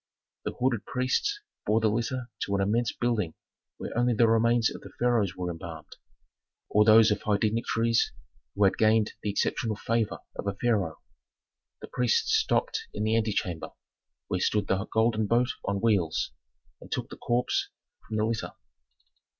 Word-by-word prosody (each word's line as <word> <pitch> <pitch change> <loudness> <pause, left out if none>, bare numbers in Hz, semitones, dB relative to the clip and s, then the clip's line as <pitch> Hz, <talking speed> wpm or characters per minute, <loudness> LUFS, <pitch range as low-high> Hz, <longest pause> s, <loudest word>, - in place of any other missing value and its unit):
The - - -2
hooded 125 -3 -1
priests 140 - 0 0.3
bore 110 +1 +4
the 110 - +2
litter 120 +2 -2
to 100 - -1
an 100 - +1
immense 115 +4 +1
building 115 -9 -1 0.4
where - - -6
only 120 0 +2
the 115 +1 +5
remains 115 +1 +3
of - - -9 0.2
pharaohs 115 -6 +1
were 90 -1 -3
embalmed, 80 -1 -9 0.7
or 105 - +5
those 110 0 +7
of 105 - 0
high 105 -1 +1
dignitaries 115 +1 +1 0.4
who 100 - +2
had 95 - +3
gained 110 -1 +3
the 105 - -2
exceptional 110 +2 0
favor 115 +1 -1 0.2
of - - -5
a 100 - -1
pharaoh. 100 -9 0 0.8
The - - -7
priests 125 -2 +1
stopped - - +1
in 105 - -2
the 110 +1 +2
antechamber, 105 -6 -1 0.5
where 95 -2 -1
stood 105 +2 +1
the 95 +1 -1
golden 110 -1 +2
boat 120 +3 +2 0.2
on 100 0 -1
wheels, 100 -8 +1 0.5
and - - -13
took - - -3
the - - -8
corpse 120 +1 0 0.4
from 110 - -3
the 110 - +2
litter. 115 0 -2
110 Hz, 160 wpm, -28 LUFS, 100-115 Hz, 0.8 s, those